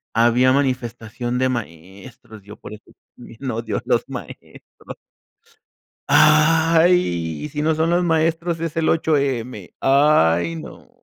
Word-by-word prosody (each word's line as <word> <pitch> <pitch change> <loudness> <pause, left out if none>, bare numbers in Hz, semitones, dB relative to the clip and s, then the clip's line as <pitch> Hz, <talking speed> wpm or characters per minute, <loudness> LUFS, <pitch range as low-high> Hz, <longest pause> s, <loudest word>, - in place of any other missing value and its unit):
Había 120 +3 +3
manifestación 120 -2 -3
de 130 0 +1
maestros. 100 +1 -9
Yo 105 +1 -12
por - - -11
eso 105 - -13 0.3
también 120 +2 -9
odio 110 -2 -4
a - - -5
los - - +1
maestros. - - -11 1.1
Ay, 155 - +3
si 150 - -3
no 160 +1 +1
son 160 +2 0
los 175 +1 +1
maestros 165 +1 0
es 165 -2 -5
el 165 -1 0
8M 135 - -2
Ay, 85 - +2
no. - - -11
130 Hz, 125 wpm, -20 LUFS, 110-160 Hz, 1.1 s, Había